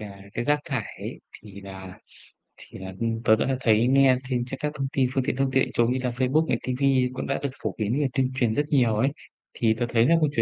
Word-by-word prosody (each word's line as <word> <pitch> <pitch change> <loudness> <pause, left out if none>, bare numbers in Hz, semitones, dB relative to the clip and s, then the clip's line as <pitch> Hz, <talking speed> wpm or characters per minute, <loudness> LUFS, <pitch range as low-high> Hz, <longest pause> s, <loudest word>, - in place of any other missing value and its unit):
nà 100 -2 -9
cái 120 - -2
rác 150 0 +2
thải 125 -7 -2 0.2
ấy - - -7
thì 100 -2 -12
nà 95 -1 -10 0.6
thì - - -12
nà, 95 0 -7
ừm, 115 0 -2
tớ 110 - +5
đã 130 +4 0
thấy 115 -1 +3
nghe 135 -1 +5
thêm 125 -1 0
trên 135 +1 -5
các 150 -1 -2
thông 135 0 -1
tin 130 -2 +2
phương 135 - +1
tiện - - -1
thông 135 0 0
tin 135 0 +3
đại - - -4
chúng 120 0 +2
như 130 - -1
là 125 - +1
Facebook 130 +6 +1
này, - - +1
ti 130 - -2
vi 135 -2 +3
cũng 130 - -5
đã 135 - -1
được 140 - 0
phổ - - -2
biến 110 +4 -1
về 145 - +2
tuyên 130 -1 +1
truyền 120 -4 +1
rất 145 - +1
nhiều 120 -6 +3
ấy, 130 +6 +2 0.4
thì 110 -2 +2
tớ 120 - 0
thấy 115 0 +3
nà 165 +6 +5
câu 150 - +3
chủ 115 - +3
125 Hz, 275 wpm, -25 LUFS, 110-135 Hz, 0.6 s, tớ